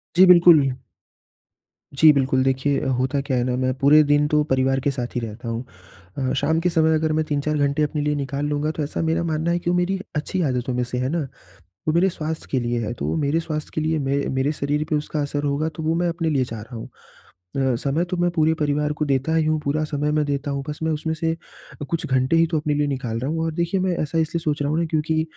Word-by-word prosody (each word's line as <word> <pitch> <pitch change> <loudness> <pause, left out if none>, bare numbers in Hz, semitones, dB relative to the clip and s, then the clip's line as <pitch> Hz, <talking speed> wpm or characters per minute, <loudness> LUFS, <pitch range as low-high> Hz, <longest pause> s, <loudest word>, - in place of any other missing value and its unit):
जी 185 +2 +8
बिल्कुल। 170 -6 +7 1.2
जी, 155 +3 +7
बिल्कुल, 130 -1 +2
देखिए 135 +2 +1
अ, - - -3
होता 130 +2 0
क्या 135 -2 -1
है 120 - +1
ना 125 0 -1
मैं 130 0 0
पूरे 145 +3 +6
दिन 145 0 +3
तो 150 0 +2
परिवार 135 -2 +1
के 140 +2 0
साथ 125 -2 -5
ही - - +1
रहता 115 +2 -6
हूँ। 115 +1 -3 0.5
अ, 130 -1 -1
शाम 160 +4 +1
के 180 +2 +1
समय 160 -2 +3
अगर 155 0 0
मैं 155 0 0
3-4 150 0 -1
घंटे 145 +1 +1
अपने 150 0 -1
लिए 150 0 0
निकाल 140 0 -3
लूँगा 150 +1 -1
तो 155 -1 -3
ऐसा 145 - -3
मेरा 165 +1 0
मानना 160 0 -1
है 175 - +1
कि 175 - -3
वो 175 - +2
मेरी 185 +2 0 0.2
अच्छी 160 +5 -2
आदतों 125 0 -2
में 125 0 0
से 125 +1 -4
है 125 +1 -1
ना? 160 -2 -2 0.6
वो - - +3
मेरे 180 +3 +4
स्वास्थ्य 160 -2 -5
के 135 - +1
लिए 120 0 -1
है 110 - -3
तो - - -4
वो - - -1
मेरे 150 +1 +1
स्वास्थ्य 155 -2 -4
के - - -1
लिए 160 +1 0
मै 140 -1 0 0.2
मेरे 130 +2 +1
शरीर 145 0 -1
पर 155 - +2
उसका 150 +1 -3
असर 145 0 -2
होगा 145 +2 0
तो 160 - -6
वो 160 +1 +1
मैं 175 +1 +1
अपने 165 -1 -1
लिए 135 -4 +1
चाह 115 -3 -7
रहा 115 +3 -10
हूँ। 115 - -7 0.7
अ, 135 -2 +1
समय 140 +7 0
तो 180 0 -4
मैं 175 0 +2
पूरे 160 -2 +2
परिवार 150 -1 0
को 150 +1 -2
देता 140 +3 0
ही 160 -1 +2
हूँ 155 0 +1
पूरा 150 +2 0
समय 150 -1 -1
मैं 150 0 +2
देता 145 0 -2
हूँ 140 0 -3
बस 150 - -5
मैं 160 - +1
उसमें 160 +1 -2
से 160 +1 -1 0.5
अ, - - -3
कुछ 165 - -2
घंटे 130 +3 +1
ही 165 0 +5
तो 165 -1 -1
अपने 150 0 -1
लिए 145 0 +1
निकाल 130 -5 -3
रहा 130 +4 -3
हूँ 160 0 -1
और 165 - -1
देखिए 170 +4 0
मैं 185 -1 0
ऐसा 155 +2 -3
इसलिए 165 +1 0
सोच 150 -2 -1
रहा 145 - 0
हूँ 155 - +1
ना 170 - +1
क्योंकि 160 0 0
150 Hz, 265 wpm, -22 LUFS, 135-160 Hz, 1.2 s, जी